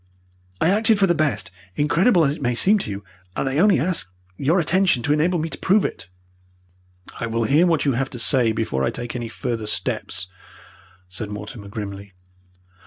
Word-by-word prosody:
I 160 - +3
acted 220 +1 +3
for 200 - +4
the 175 - +3
best, 155 - -1 0.2
incredible 170 +4 +3
as 140 +1 0
it - - -13
may 125 -2 0
seem 205 - +4
to 115 - -5
you, 100 0 -5 0.3
and - - -1
I 135 +3 0
only 200 -4 +5
ask 150 - -1 0.2
your 145 - +1
attention 175 -6 +2
to 145 - +2
enable 165 +4 +2
me 160 0 -1
to - - -7
prove 200 +2 +3
it." - - -5 1.1
"I 115 - -2
will 115 0 -1
hear 150 +10 +4
what 165 -4 +1
you 140 - +3
have 135 +2 -1
to 125 - -8
say 120 0 +2
before 110 -12 -1
I - - +2
take 120 0 -6
any 120 -2 -4
further 115 -2 -4
steps," 100 - -2 0.8
said 100 +4 -5
Mortimer, 105 0 -8
grimly. 100 -2 -7
135 Hz, 190 wpm, -22 LUFS, 110-170 Hz, 1.1 s, only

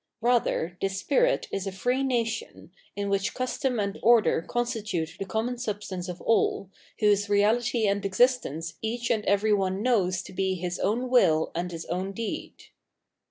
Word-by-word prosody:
Eather 230 -8 +1
this 195 0 -1
spirit - - +1
is 195 0 -3
a - - -2
free 245 +8 0
nation, 255 - -2 0.2
in 205 0 -2
which 195 -1 0
custom 255 -1 -1
and 200 0 -2
order 230 -7 +4
constitute 220 -7 -2
the 195 - -3
common 235 +4 -2
substance 200 -5 -4
of 180 0 -6
all, 200 -3 +1 0.3
whose 205 -1 +3
reahty 220 +3 +2
and 200 0 +1
existence 190 - +1
each 235 +2 -2
and 220 -2 +1
every 210 +2 +3
one 195 0 0
knows 190 -7 +1
to - - -11
be 190 0 0
his 180 0 -4
own 240 +5 0
will 160 -11 +4
and 175 +2 -3
his 165 -1 -6
o 175 - 0
wn 190 +2 -4
deed. 230 0 -4
205 Hz, 165 wpm, -27 LUFS, 190-240 Hz, 0.3 s, order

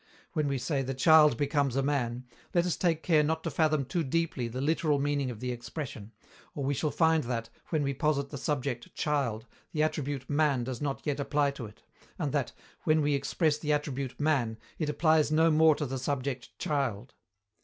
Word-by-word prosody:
When 150 -2 0
we 140 -1 0
say 135 +2 -1
"The 135 0 -3
child 150 -1 +6
becomes 140 -2 +1
a 135 - +1
man," 130 -3 -1 0.3
let 175 0 +4
us 180 - 0
take 165 -3 0
care 160 -4 +4
not 160 +2 0
to - - -2
fathom 155 -3 +2
too 165 +6 -1
deeply 150 -4 -1
the 120 +3 -5
literal 150 +1 +1
meaning 140 -1 0
of 115 -4 -7
the 125 0 -2
expression, 120 -3 -6 0.4
or 140 - -3
we 140 +2 +1
shall 145 +3 0
find 160 -1 +2
that, 115 -1 -3 0.2
when 155 -3 0
we 140 0 0
posit 140 -1 0
the 140 - -5
subject 135 -4 -3
"child," 130 -7 -1 0.3
the 155 -2 +2
attribute 145 -4 -2
"man" 145 -4 +2
does 125 -1 -5
not 140 -2 -3
yet 145 -1 -1
apply 145 0 +1
to 135 -5 -7
it, 105 - -17 0.3
and - - -1
that, - - -1 0.3
when 155 0 +3
we 145 0 +2
express 145 +3 +1
the 150 -1 0
attribute 140 -3 -3
"man," 135 -7 +1 0.2
it 155 -3 -1
applies 155 -1 +3
no 160 +1 +4
more 155 0 +5
to 150 - -2
the 135 0 -3
subject 130 -1 -3
"child." 135 -9 -2
145 Hz, 200 wpm, -29 LUFS, 130-155 Hz, 0.4 s, child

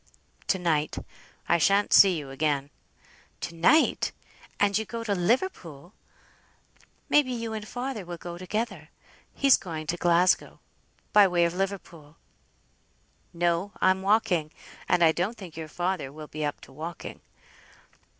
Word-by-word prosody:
"To 190 - +2
night. 160 -4 0 0.5
I 170 - +3
shan't 200 +5 +3
see 190 -3 +7
you 140 -3 -7
again." 140 0 -1 0.7
"To 170 - -5
night! 175 - +3 0.5
and 205 -1 +2
you 220 - +2
go 230 +1 -6
to 210 -3 -1
Liverpool! 180 - -1 1.1
May 295 - +5
be 255 -3 -6
you 230 -2 -4
and 215 -1 -6
father 245 -3 -4
will 175 -1 -7
go 175 0 -8
together. 215 +6 -4 0.5
He's 275 -1 +5
going 160 -3 -6
to 170 +3 -2
Glasgow, 175 +1 +2 0.5
by 205 -1 +7
way 175 -2 +2
of 170 - -1
Liverpool." 175 -5 -5 1.1
"No! 175 +3 0
I'm 190 0 +3
walking; 190 -6 +1 0.4
and 175 - +4
I 160 - +6
don't 185 +8 -2
think 180 -6 -10
your 160 -1 -6
father 175 -4 -3
will 155 +1 -9
be 155 +1 -5
up 145 -1 -3
to - - -14
walking." 160 +4 -8
175 Hz, 145 wpm, -27 LUFS, 160-205 Hz, 1.1 s, see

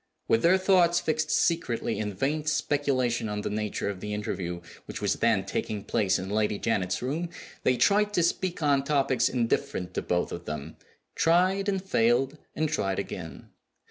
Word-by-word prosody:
With 115 - +3
their 180 +3 +5
thoughts 180 -2 +4
fixed 155 -1 -1
secretly 125 -10 0
in 105 -2 -3
vain 150 +8 -1
speculation 135 -6 0
on 105 0 -3
the - - -3
nature 105 -1 -2
of 100 -2 -3
the 105 +2 -4
interview 90 -4 -4 0.2
which - - -6
was - - 0
then - - +2
taking 105 -2 -3
place 100 -2 +1
in 95 - -5
Lady 105 0 0
Janet's 95 -3 -1
room, 160 +7 -2 0.3
they 125 - +2
tried 210 +5 +3
to 175 - +3
speak 170 0 -1
on 140 -2 +3
topics 135 -4 +2
indifferent 115 -6 -1
to - - -1
both 90 0 -1
of - - -6
them 75 +1 -6 0.4
tried, 185 +4 +2
and 190 -2 -1
failed, 130 -3 +2 0.2
and 155 - +1
tried 95 -9 -1
again. - - -6
130 Hz, 175 wpm, -27 LUFS, 105-165 Hz, 0.4 s, their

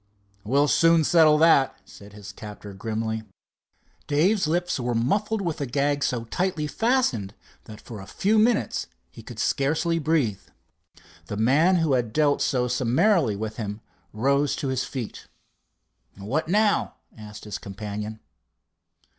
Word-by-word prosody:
"We'll 140 +7 +2
soon 165 +1 +4
settle 155 -1 +5
that," 155 -4 +4
said 100 0 -14
his 105 -1 -10
captor 105 -1 -10
grimly. 110 +2 -3 0.9
Dave's 180 +6 +2
lips 175 0 -1
were 120 -1 -2
muffled 200 - 0
with 165 -4 -3
a 140 - -2
gag 140 +2 0
so 120 -2 -1
tightly 165 +5 -2
fastened 150 - 0 0.3
that 105 -2 -11
for 110 -2 -10
a 95 - -11
few 215 +3 +1
minutes 215 - +1 0.2
he - - -12
could 115 0 -11
scarcely 150 +8 0
breathe. 140 -11 0 0.9
The 105 - -5
man 145 - +3
who 165 -5 +1
had 120 -4 0
dealt 150 -2 +2
so 125 -2 +1
summarily 130 - +2
with 110 +1 -5
him 105 -1 -5 0.3
arose 140 +6 +1
to 135 - -3
his 130 -1 -1
feet. 125 -5 -7 0.9
"What 120 +12 -2
now?" 205 +3 +1 0.2
asked 105 -1 -11
his 105 - -5
companion. 105 +2 -6
135 Hz, 140 wpm, -25 LUFS, 110-165 Hz, 0.9 s, settle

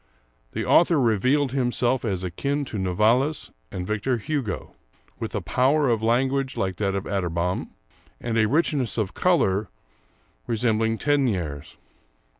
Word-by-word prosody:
The - - -2
author 170 -2 +4
revealed 130 +4 +2
himself 125 -1 +1
as 95 -5 -2
akin 140 +11 -2
to 110 -6 -5
Novalis 110 - +1 0.2
and 90 -3 -4
Victor 110 +5 -1
Hugo, 130 -5 -3 0.5
with - - -4
a - - -1
power 140 +2 +2
of 115 -2 +1
language 130 +4 +1
like 95 -2 -1
that 100 -2 0
of 100 - -2
Atterbom, 90 -2 -2 0.5
and 120 -1 -3
a 110 -1 +3
richness 140 -4 +1
of 105 -4 -1
color 105 - +2 0.8
resembling 115 -1 +1
Tegnèr's. 90 - -1
115 Hz, 130 wpm, -24 LUFS, 95-135 Hz, 0.8 s, author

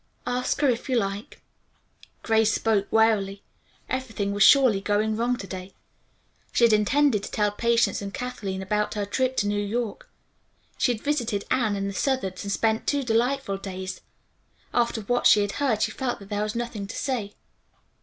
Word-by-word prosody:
"Ask 250 +3 -1
her 290 - +4
if 245 +2 -1
you 255 - +2
like." 200 0 -4 0.8
Grace 220 -1 +3
spoke 210 -2 +1
wearily. 210 -3 +2 0.4
Everything 225 -6 -2
was 205 0 -3
surely 250 -4 +6
going 210 +2 +1
wrong 240 +2 0
to 200 - -7
day. 185 0 -8 0.8
She - - +1
had 230 -2 +6
intended 215 +2 +3
to - - -6
tell 210 -1 +1
Patience 235 +2 +1
and 200 0 -5
Kathleen 200 -6 -4
about 210 +3 -1
her 205 -1 -1
trip 260 +5 -1
to 205 - +1
New 205 0 0
York. 220 +1 -3 0.7
She 250 - +3
had 225 -3 -5
visited 240 -9 -1
Anne 230 -5 +2
and 195 0 -2
the 200 - -4
Southards 195 -5 -1
and 200 - -4
spent 220 +2 0
two 285 -1 +1
delightful 245 -2 0
days. 190 -1 -6 0.7
After 235 -2 +1
what 245 +4 +2
she 210 - +6
had 205 -1 -1
heard 225 -7 +2
she 225 - 0
felt 250 +1 -3
that 200 -1 -13
there 205 -1 -1
was 210 +1 -2
nothing 235 -4 -4
to 205 - -7
say. 230 -7 -3
220 Hz, 180 wpm, -25 LUFS, 200-245 Hz, 0.8 s, surely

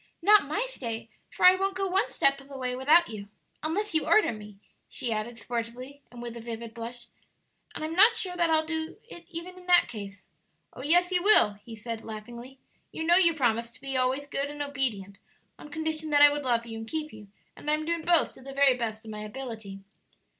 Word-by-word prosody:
"Not 415 -4 +6
my 410 - -1
stay; 230 - -5 0.2
for - - 0
I 365 - +10
won't 390 +1 -1
go 390 +1 -1
one 385 +4 +1
step 275 0 +1
of 275 - -17
the 275 - -8
way 250 -1 -2
without 310 +7 +4
you, 205 -2 -8 0.3
unless 390 +7 -2
you 315 - 0
order 430 - +4
me!" 210 -2 -11 0.3
she 235 -2 -2
added, 220 +2 -4
sportively, 245 +4 -5
and 240 -1 -9
with 240 -1 -6
a 235 - -8
vivid 230 0 -7
blush; 235 +1 -8 0.7
"and - - -5
I'm 315 - -4
not 425 +7 +6
sure 370 -6 -1
that 340 -1 +1
I'll 315 0 +3
do 320 0 -4
it 345 -7 -12
even 360 +2 -7
in 360 - -16
that 355 -1 +5
case." 200 -3 -9 0.5
"Oh, - - -9
yes 350 +6 +3
you 360 -1 +2
will," 390 - +6
he 230 +1 -9
said, 225 +1 -6
laughingly. 235 +4 -9 0.3
"You 320 - -4
know 340 +2 +4
you 340 -3 +4
promised 235 -4 0
to - - -17
be 270 -1 -4
always 260 +2 0
good 285 0 -3
and 290 0 -4
obedient 235 -9 -3 0.4
on 295 - -11
condition 315 0 -3
that 290 -1 +5
I 290 - +9
would 290 -1 -3
love 235 -2 +1
you 225 -1 -7
and 225 - -8
keep 310 -1 -4
you; 210 -1 -12 0.3
and 300 - -6
I'm 305 +1 +1
doing 335 0 -1
both 340 0 +3
to - - -15
the 275 +1 -9
very 275 -2 +4
best 225 -2 -4
of 220 - -8
my 210 - -6
ability." 215 -4 -7
275 Hz, 225 wpm, -28 LUFS, 230-325 Hz, 0.7 s, I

